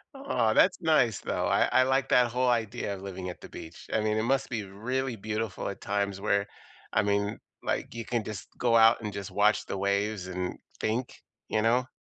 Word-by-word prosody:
Aw, 190 Hz, -, +1 dB
that's 185 Hz, -, +4 dB
nice, 150 Hz, -, +3 dB
though, -, -, -1 dB
I -, -, +4 dB
I 130 Hz, -, +5 dB
like 130 Hz, +1 st, +1 dB
that 120 Hz, -2 st, +4 dB
whole 125 Hz, +1 st, +1 dB
idea 115 Hz, -3 st, -1 dB
of 95 Hz, -, -10 dB
living 95 Hz, -2 st, -5 dB
at 90 Hz, -, -8 dB
the -, -, -10 dB
beach. 80 Hz, -, -10 dB
I -, -, +3 dB
mean, 110 Hz, 0 st, +1 dB
it 110 Hz, -, +1 dB
must 135 Hz, +2 st, +1 dB
be 115 Hz, -4 st, -2 dB
really 120 Hz, +6 st, -3 dB
beautiful 110 Hz, 0 st, -3 dB
at 100 Hz, -, -7 dB
times 100 Hz, -1 st, -1 dB
where, 100 Hz, 0 st, +1 dB, 0.5 s
I 95 Hz, -, +3 dB
mean, 100 Hz, 0 st, 0 dB, 0.2 s
like, -, -, -2 dB
you 115 Hz, -1 st, -5 dB
can 120 Hz, -3 st, -1 dB
just 105 Hz, -2 st, -7 dB
go 120 Hz, -2 st, +2 dB
out 115 Hz, +1 st, +6 dB
and 105 Hz, -, -4 dB
just 100 Hz, -1 st, -6 dB
watch 105 Hz, +1 st, +3 dB
the -, -, -4 dB
waves 100 Hz, 0 st, 0 dB
and 90 Hz, 0 st, -3 dB, 0.2 s
think, 115 Hz, +4 st, -2 dB, 0.3 s
you 110 Hz, -, +1 dB
know? 120 Hz, +3 st, +2 dB
110 Hz, 210 wpm, -28 LUFS, 100-120 Hz, 0.5 s, out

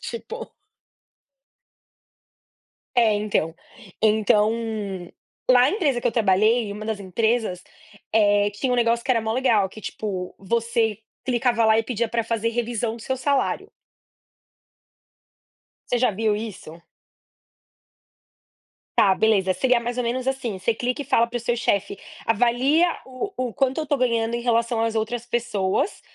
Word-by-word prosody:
tipo 470 Hz, 0 st, -7 dB, 2.5 s
É 225 Hz, -3 st, +5 dB
então 205 Hz, -6 st, 0 dB, 0.5 s
então, 215 Hz, 0 st, +3 dB, 1.0 s
na 250 Hz, +1 st, +6 dB
empresa 290 Hz, -, 0 dB
que -, -, +1 dB
eu -, -, 0 dB
trabalhei, 215 Hz, +1 st, +3 dB
uma 210 Hz, +1 st, -7 dB
das 220 Hz, -2 st, -3 dB
empresas, 220 Hz, 0 st, 0 dB, 0.5 s
eh, 205 Hz, -1 st, +4 dB
tinha 250 Hz, +6 st, -2 dB
um -, -, +3 dB
negócio 235 Hz, -1 st, +2 dB
que -, -, +1 dB
era 230 Hz, -2 st, +2 dB
maior 220 Hz, 0 st, -2 dB
legal 235 Hz, -6 st, +2 dB
que 215 Hz, +2 st, -12 dB
tipo, 185 Hz, -3 st, -5 dB
você 225 Hz, +1 st, 0 dB, 0.3 s
clicava 240 Hz, -2 st, +2 dB
lá 220 Hz, 0 st, +5 dB
e 225 Hz, -, +2 dB
pedia 235 Hz, 0 st, -1 dB
para 230 Hz, 0 st, -1 dB
fazer 230 Hz, 0 st, -1 dB
revisão 230 Hz, -1 st, -2 dB
do 235 Hz, -, -11 dB
seu 260 Hz, +3 st, -2 dB
salário. 275 Hz, +1 st, 0 dB, 2.2 s
Você 245 Hz, -, +1 dB
já 250 Hz, -, +3 dB
viu 215 Hz, +1 st, 0 dB
isso? 195 Hz, -6 st, -8 dB, 2.2 s
Tá 195 Hz, -3 st, +6 dB
beleza. 195 Hz, -3 st, +2 dB
Seria 250 Hz, +3 st, +2 dB
mais 240 Hz, +1 st, -4 dB
ou 250 Hz, -, 0 dB
menos 245 Hz, +2 st, -2 dB
assim, 265 Hz, -6 st, -2 dB
você 190 Hz, +5 st, 0 dB
clica 250 Hz, +5 st, -2 dB
e -, -, -6 dB
fala 235 Hz, -3 st, +3 dB
para 235 Hz, -, -10 dB
o -, -, 0 dB
seu 240 Hz, +1 st, -1 dB
chefe, 200 Hz, -3 st, 0 dB, 0.3 s
avalia 245 Hz, +9 st, +3 dB, 0.2 s
o 255 Hz, +7 st, -4 dB, 0.2 s
o 235 Hz, -, -8 dB
quanto 265 Hz, +7 st, 0 dB
eu -, -, -1 dB
estou 290 Hz, -1 st, 0 dB
ganhando 235 Hz, -2 st, +1 dB
em 235 Hz, -, -3 dB
relação 235 Hz, -1 st, +1 dB
às 225 Hz, 0 st, 0 dB
outras 225 Hz, +2 st, -2 dB
pessoas 235 Hz, -, -1 dB
230 Hz, 145 wpm, -23 LUFS, 215-245 Hz, 2.5 s, na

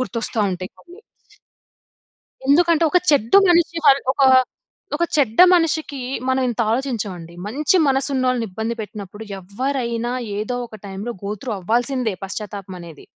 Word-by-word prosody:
గుర్తోస్తా 235 Hz, -2 st, -3 dB
ఉంటాయి 185 Hz, 0 st, -5 dB
కొన్ని. 355 Hz, +4 st, -16 dB, 1.5 s
ఎందుకంటే, 335 Hz, +3 st, +4 dB
ఒక 360 Hz, -, +4 dB
చెడ్డ 260 Hz, -6 st, +2 dB, 0.2 s
మనిషి 340 Hz, -1 st, +3 dB
వల్ 275 Hz, -1 st, +6 dB
ఒక 280 Hz, -, -2 dB, 0.7 s
ఒక 340 Hz, -, 0 dB
చెడ్డ 265 Hz, -5 st, +1 dB
మనిషికి, 315 Hz, -4 st, 0 dB, 0.3 s
మనం 260 Hz, 0 st, +1 dB
ఇంత 240 Hz, -1 st, -1 dB
ఆలోచించమండి. 205 Hz, -10 st, -3 dB
మంచి 295 Hz, -, +1 dB
మనసు 270 Hz, +1 st, +1 dB
ఉన్నోళ్ళని 255 Hz, -3 st, +1 dB
ఇబ్బంది 220 Hz, +5 st, -4 dB
పెట్టినప్పుడు, 205 Hz, 0 st, -8 dB, 0.2 s
ఎవ్వరైనా 235 Hz, +4 st, -3 dB, 0.3 s
ఏదో 220 Hz, +4 st, -3 dB
ఒక 215 Hz, -1 st, -12 dB
టైమ్‌లో 200 Hz, +5 st, -5 dB
గోత్రు 210 Hz, +4 st, -5 dB
అవ్వాల్సిందే. 240 Hz, +3 st, 0 dB
పశ్చాత్తాపం 195 Hz, -1 st, -6 dB
అనేది. 170 Hz, -3 st, -12 dB
240 Hz, 125 wpm, -20 LUFS, 205-275 Hz, 1.5 s, వల్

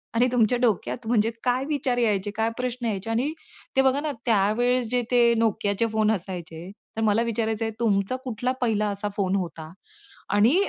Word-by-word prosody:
आणि 245 Hz, +2 st, +4 dB
तुमच्या 245 Hz, 0 st, +3 dB
डोक्यात 230 Hz, 0 st, 0 dB
म्हणजे 225 Hz, -1 st, +3 dB
काय 255 Hz, +2 st, +1 dB
विचार 270 Hz, -4 st, 0 dB
यायचे? 205 Hz, -4 st, +1 dB
काय 225 Hz, +1 st, +1 dB
प्रश्न 250 Hz, -1 st, -3 dB
यायचे? 210 Hz, -1 st, -2 dB
आणि 255 Hz, +7 st, 0 dB, 0.4 s
ते 265 Hz, -, +5 dB
बघा 265 Hz, +1 st, +3 dB
ना, 305 Hz, -1 st, -2 dB
त्यावेळेस 235 Hz, +3 st, +2 dB
जे 250 Hz, 0 st, +2 dB
ते 245 Hz, -1 st, +5 dB, 0.2 s
NOKIAचे 210 Hz, -1 st, +1 dB
फोन 215 Hz, 0 st, +3 dB
असायचे, 175 Hz, -3 st, -5 dB, 0.3 s
तर -, -, 0 dB
मला 215 Hz, +1 st, +3 dB
विचारायचंय, 225 Hz, -1 st, -1 dB
तुमचा 205 Hz, 0 st, +1 dB
कुठला 250 Hz, 0 st, -2 dB
पहिला 215 Hz, -3 st, +1 dB
असा 200 Hz, +1 st, -3 dB
फोन 195 Hz, -1 st, +1 dB
होता? 165 Hz, -4 st, -4 dB, 0.6 s
आणि 220 Hz, +9 st, +4 dB
225 Hz, 170 wpm, -25 LUFS, 205-245 Hz, 0.6 s, ते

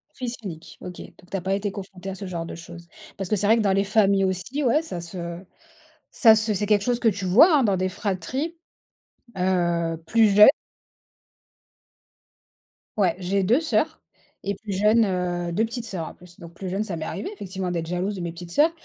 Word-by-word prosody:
Fils 245 Hz, -2 st, -4 dB
unique, 165 Hz, -4 st, -8 dB
OK, 180 Hz, -1 st, -8 dB
donc 180 Hz, -, -15 dB
tu 195 Hz, -, -2 dB
as -, -, -5 dB
pas 190 Hz, +2 st, -1 dB
été 200 Hz, +1 st, -1 dB
confronté 190 Hz, -1 st, -8 dB
à 190 Hz, -, -5 dB
ce 195 Hz, -, -7 dB
genre 170 Hz, -3 st, -4 dB
de -, -, -7 dB
chose. 170 Hz, 0 st, -11 dB, 0.3 s
Parce 195 Hz, -2 st, -4 dB
que 215 Hz, -, +2 dB
c'est 205 Hz, -, -1 dB
vrai 225 Hz, -, +5 dB
que 225 Hz, -, +2 dB
dans 195 Hz, -2 st, +2 dB
les 195 Hz, -, +2 dB
familles 200 Hz, -1 st, +3 dB
aussi, 190 Hz, +10 st, -2 dB
ouais, 270 Hz, +5 st, +3 dB
ça 180 Hz, -, -6 dB
se 170 Hz, 0 st, -6 dB, 0.7 s
ça 225 Hz, -3 st, +6 dB
se 220 Hz, 0 st, 0 dB
c'est 205 Hz, +1 st, -1 dB
quelque 205 Hz, -1 st, +3 dB
chose 245 Hz, +1 st, 0 dB
que 235 Hz, -, +1 dB
tu 200 Hz, -3 st, 0 dB
vois, 295 Hz, -, +6 dB
hein, -, -, +2 dB
dans 200 Hz, -4 st, +2 dB
des 185 Hz, +1 st, 0 dB
fratries, 210 Hz, -, -3 dB, 0.8 s
heu, 170 Hz, -3 st, +1 dB
plus 225 Hz, +4 st, +4 dB
jeunes. 210 Hz, -, +10 dB, 2.5 s
Ouais, 185 Hz, -5 st, +2 dB
j'ai 195 Hz, +2 st, 0 dB
2 240 Hz, -, +3 dB
sœurs 320 Hz, -, 0 dB, 0.4 s
et 200 Hz, 0 st, -2 dB
plus 205 Hz, 0 st, -6 dB
jeune, 215 Hz, +4 st, +4 dB
heu 175 Hz, -2 st, -2 dB
2 215 Hz, -, +2 dB
petites 230 Hz, +1 st, -6 dB
sœurs 180 Hz, -7 st, -5 dB
en -, -, -9 dB
plus. 180 Hz, -1 st, -17 dB
Donc, 170 Hz, 0 st, -11 dB
plus 185 Hz, +2 st, -6 dB
jeune, 195 Hz, +3 st, -1 dB
ça 195 Hz, -5 st, -4 dB
m'est 160 Hz, -1 st, -5 dB
arrivé 370 Hz, -, -4 dB
effectivement 190 Hz, -, -5 dB
d'être 165 Hz, -2 st, -3 dB
jalouse 180 Hz, +4 st, -2 dB
de 185 Hz, -, -6 dB
mes 170 Hz, -1 st, -3 dB
petites 170 Hz, 0 st, -10 dB
sœurs 305 Hz, -, +4 dB
195 Hz, 215 wpm, -24 LUFS, 175-215 Hz, 2.5 s, jeunes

